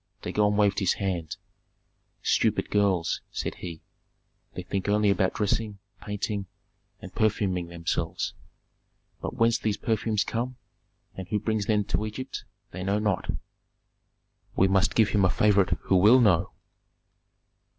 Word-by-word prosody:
Dagon 105 -1 +1
waved 100 -2 +3
his 95 -3 +2
hand. 90 -6 -3 0.9
"Stupid - - +1
girls!" 95 -5 +1
said - - -3
he. 85 -3 -7 0.7
"They 90 - -5
think 95 +2 -3
only 105 0 +3
about 95 -1 +1
dressing, 105 0 -1 0.2
painting, 105 -1 -3 0.6
and 95 - -9
perfuming 100 -5 0
themselves; 85 -1 -3 0.9
but - - -4
whence 115 +1 +3
these 105 -2 -1
perfumes 110 -1 0
come, 120 +3 -3 0.6
and 95 -2 -7
who 105 +3 0
brings 110 -1 -1
them 105 -2 +2
to 105 - -1
Egypt, 110 +5 -6 0.3
they 90 +1 -6
know 100 +2 +1
not." 105 -3 -1 1.3
"We 95 - +4
must 95 0 +2
give 110 -2 +4
him 100 -1 +2
a 95 - +4
favorite 100 0 +3
who 95 - +2
will 105 +8 +7
know." 95 -6 +3
100 Hz, 135 wpm, -27 LUFS, 95-105 Hz, 1.3 s, will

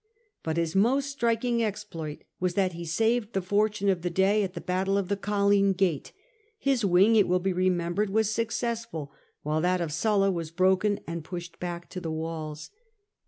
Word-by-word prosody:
But 160 0 -2
his 165 0 -1
most 265 +8 +2
striking 235 -2 +1
exploit 170 -8 -5 0.2
was 180 -1 -1
that 190 -2 +1
he 170 0 -6
saved 225 +6 +1
the 195 - +1
fortune 205 +1 +1
of 185 -3 +2
the 175 - -1
day 190 +4 +3
at 195 -2 -3
the - - -4
battle 190 +2 0
of 195 -2 -1
the 200 - +2
Colline 200 -1 +2
gate; 180 -7 0 0.5
his 275 - +1
wing, 195 +4 +5
it 205 -3 +5
will 180 +1 +3
be 190 +1 -1
remem 175 -1 +1
bered, 205 +2 0
was 220 +1 +1
successful, 230 - -3 0.3
while 155 +1 0
that 180 +1 +2
of 165 -3 -2
Sulla 195 +3 +2
was 165 -3 -3
broken 190 +4 +2
and 165 -1 -5
pushed 175 +1 -7
back 175 -1 -5
to 180 - -5
the 165 - -4
walls. 160 -1 -5
190 Hz, 190 wpm, -27 LUFS, 170-210 Hz, 0.5 s, wing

